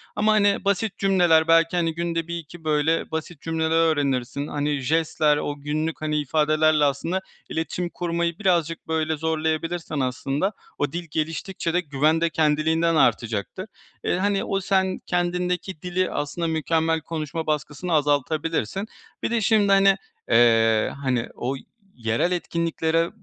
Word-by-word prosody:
ama, 215 +1 +3
hani, 205 -2 +2
basit 200 +1 0
cümleler 175 -5 +4
belki, 165 +1 +4
hani, 165 -2 +1
günde 165 -1 -2
1-2, 170 -1 -7
böyle, 155 +2 +1
basit 160 -1 -5
cümleler 160 -1 -1 0.2
öğrenirsin, 140 -2 -1
hani, 145 -1 -1
jestler, 150 +1 +2
o 145 - -3
günlük, 155 +3 -3
hani, 155 -1 0
ifadelerle, 155 +1 +3
aslında, 165 +7 -1 0.3
iletişim 175 +2 -3
kurmayı 170 -1 -2
birazcık 170 -6 0
böyle 160 -1 0
zorlayabilirsen, 160 0 -2
aslında, 135 +7 -1 0.3
o 145 - -1
dil 170 +1 -5
geliştikçe 165 +3 -2
de 180 - +3
güven 155 +1 +1
de 170 - +2
kendiliğinden 160 +2 +2
artacaktır. 120 - 0 0.4
Eee, - - +1
hani, 200 +1 +1
o 195 -4 -1
sen 190 0 +1
kendindeki 180 -1 -1
dili, 180 +1 -1
aslında, 165 +3 -2
mükemmel 160 0 0
konuşma 160 0 -4
baskısını 150 +3 -2
azaltabilirsin. 155 - 0 0.4
Bir - - -1
de 235 -1 +1
şimdi, 215 -1 +3
hani, 195 0 +6 0.3
eee, 115 -2 +4
hani, 125 -3 0
o 130 +3 -2 0.4
yerel 115 +8 0
etkinliklere 165 -1 0
160 Hz, 135 wpm, -24 LUFS, 150-175 Hz, 0.4 s, hani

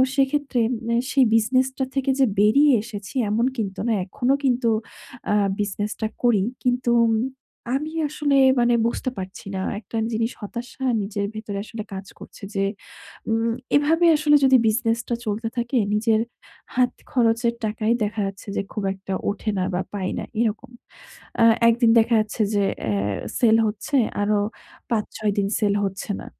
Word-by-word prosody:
সেইক্ষেত্রে 275 -2 +1 0.3
মানে 235 - +1 0.2
সেই 270 -2 +5
বিজনেসটা 255 +4 +1
থেকে 270 0 +1
যে 270 - +6
বেরিয়ে 275 +8 +5
এসেছি 215 +1 -8
এমন 225 +3 +1
কিন্তু 200 -4 -3
না, - - +2
এখনো 245 +7 0
কিন্তু 245 -2 +2 0.6
আ - - +3 0.3
বিজনেসটা 205 +2 -2 0.2
করি। 235 -5 +4 0.2
কিন্তু 245 -1 +1
উম 225 -1 +2 0.6
আমি 305 +3 -3 0.2
আসলে 295 -1 0 0.2
মানে 240 0 +3
বুঝতে 255 - -2
পারছি 190 0 -7
না 190 - -2 0.2
একটা 220 +2 -7 0.2
জিনিস 225 +2 0
হতাশা 240 +5 -7 0.2
নিজের 200 0 -3
ভেতরে 215 -2 -5
আসলে 220 -1 -6
কাজ 190 0 -6
করছে - - -13
যে 195 - +1 0.7
উম 225 +1 +1 0.3
এভাবে 315 +4 +3
আসলে 295 0 +4
যদি 260 -1 +6
বিজনেসটা 230 +1 0
চলতে 215 +2 -2
থাকে, 240 +2 0 0.2
নিজের 220 +1 +2 0.5
হাত 250 0 +3 0.2
খরচের 235 -1 +2
টাকাই 215 +1 -1
দেখা 210 +1 -3
যাচ্ছে 195 +1 -9
যে - - +2
খুব 210 - -3
একটা 195 0 -6 0.2
ওঠে 205 +2 -3
না 185 - +1
বা, 180 - 0
পাই 190 -2 -2
না, - - -4 0.2
এরকম। 235 +2 -2 0.7
আ - - +7 0.2
১ 230 - +6
দিন 230 - +6
দেখা 225 +1 +3
যাচ্ছে 215 +1 -2
যে 200 - +3 0.3
এ - - +1 0.5
সেল 225 -3 +5
হচ্ছে, 215 +7 -2 0.2
আরো 205 0 +2 0.5
৫-৬ 215 -1 -1
দিন 195 - +1
সেল 205 -2 +2
হচ্ছে 195 +1 -4
না। - - -10
225 Hz, 160 wpm, -23 LUFS, 210-250 Hz, 0.7 s, আ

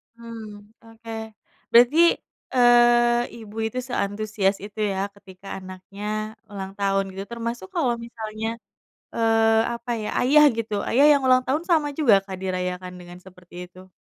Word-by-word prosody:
Hmm 220 -3 -11
oke. 225 0 -12 0.6
Berarti, 245 +7 +6 0.6
eee, 240 -1 +5 0.2
ibu 220 -1 -12
itu 225 +3 -4
seantusias 205 -3 -1
itu 210 +1 -9
ya 190 - -3 0.2
ketika 195 -1 -15
anaknya 185 +2 -10 0.5
ulang 195 -1 -6
tahun 195 0 +1
gitu 195 +1 -5
termasuk 235 -4 -5
kalau 260 -8 +1
misalnya 220 -1 -6 0.7
eee, 225 -1 +3
apa 235 +1 -6
ya, 210 - -4
ayah 295 +4 +6
gitu, 220 -2 -3 0.2
ayah 275 +5 +4
yang 280 - +2
ulang 255 0 +5
tahun 295 +6 -1
sama 310 -3 +3
juga, 275 -9 +4
Kak, 190 -2 -7
dirayakan 180 -1 -3
dengan 175 0 -12
seperti 180 -2 -16
itu? 185 +1 -16
220 Hz, 140 wpm, -23 LUFS, 195-240 Hz, 0.7 s, Berarti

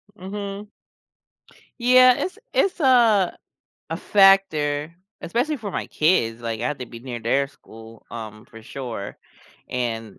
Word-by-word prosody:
Mhm. 200 +1 -7 1.1
Yeah, 255 +1 +7
it's 375 +4 -4 0.2
it's 375 -3 +1
a 230 - +4 0.5
a - - -2
factor, 165 -6 +3 0.3
especially 255 - -1
for 205 -3 -6
my - - -4
kids, 120 -9 +1
like, 115 -1 -4
I 125 - -1
have 150 - -4
to 125 - -6
be 115 0 -11
near 120 -2 -6
their 135 +5 +1
school, 115 -3 -15
um, 110 0 -9
for 115 0 -14
sure. 115 -5 -7 0.5
And, 115 -4 -4
145 Hz, 135 wpm, -22 LUFS, -, 1.1 s, Yeah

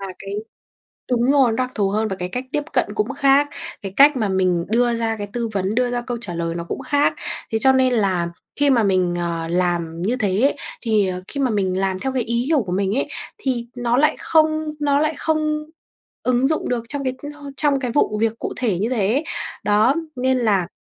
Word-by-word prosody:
là 195 - -5
cái 195 0 -7 0.8
đúng 245 +2 +3
rồi, 270 -5 +4
đặc 255 0 -1
thù 200 -2 +1
hơn 215 +2 0
và 195 - -3
cái 180 0 -3
cách 250 +6 -3
tiếp 295 - 0
cận - - +3
cũng 425 - +1
khác, 275 +1 +4 0.3
cái 195 - -5
cách 285 0 +6
mà 215 -4 0
mình 185 -3 +1
đưa 240 +1 +2
ra 225 -1 -1
cái 205 -1 -5
tư 235 -1 -1
vấn, 195 +2 -1
đưa 245 0 +1
ra 245 0 -1
câu 240 0 -4
trả 195 -6 -3
lời 165 0 -2
nó 170 - -3
cũng 170 - -5
khác 290 0 +2 0.4
thế 220 - +1
cho 265 - +6
nên 260 -1 +3
là 190 -6 +1 0.3
khi 290 - +4
mà 245 -4 +4
mình, 185 -3 +2
ờ, 170 -1 -2
làm 170 -1 -1
như 215 +7 +1
thế 205 -4 0
ấy 275 - +3 0.3
thì 215 -5 +2 0.2
khi 280 - -4
mà 260 - +2
mình 190 -4 0
làm 190 -1 0
theo 265 +3 -2
cái 255 -2 0
ý 235 +1 -1
hiểu 300 -1 +2
của 185 - -6
mình 195 +2 0
ấy, - - 0 0.3
thì 250 - -2
nó 240 0 +1
lại 300 +3 +4
không 310 -1 +2
nó 285 -1 +2
lại 310 +1 +1
không 305 0 0 0.6
ứng 255 +1 +2
dụng 310 +2 -1
được 240 -2 -1
trong 285 0 -2
cái, 260 -1 -1 0.2
ơ, 290 -1 -9
trong 290 -2 +2
cái 250 -3 -2
vụ 220 -4 +1
việc 225 0 0
cụ - - -4
thể 225 -8 0
như 215 +4 0
thế. 240 +4 +1 0.4
Đó, 210 +6 +3 0.2
nên 260 +1 +1
là 200 -7 +2
235 Hz, 230 wpm, -21 LUFS, 195-270 Hz, 0.8 s, cách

